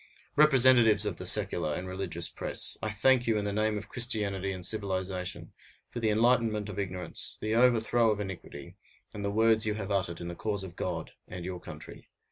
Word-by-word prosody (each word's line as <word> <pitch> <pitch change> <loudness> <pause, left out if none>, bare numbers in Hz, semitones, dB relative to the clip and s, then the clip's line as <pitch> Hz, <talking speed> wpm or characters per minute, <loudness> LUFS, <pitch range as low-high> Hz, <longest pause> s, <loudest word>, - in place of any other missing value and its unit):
Representatives 130 -7 +5
of 100 -5 -3
the - - -4
secular 75 -1 +1
and 90 - -5
religious 90 -2 -1
press! - - -1
I 110 - -2
thank 120 +4 +2
you, 110 -2 +2
in 105 - -2
the 100 - -2
name 110 0 0
of 105 - -7
Christianity 100 -5 0
and 90 -2 -4
civilization, 95 -3 -2 0.4
for 120 - -5
the 110 -2 +1
enlightenment 110 -1 +2
of 100 0 -6
ignorance, 90 -3 -2
the 110 0 -2
overthrow 120 -1 +3
of 105 -1 0
iniquity, 95 -3 -8 0.4
and 100 - -6
the 100 - -1
words 110 +1 +3
you 105 - 0
have 105 -1 -5
uttered 90 -4 -1
in 85 - -6
the 85 - -5
cause 100 +2 -2
of 90 -2 -9
God - - -4 0.2
and 90 -1 -7
your 90 -1 -5
country. 80 -3 -11
105 Hz, 195 wpm, -29 LUFS, 95-110 Hz, 0.4 s, Representatives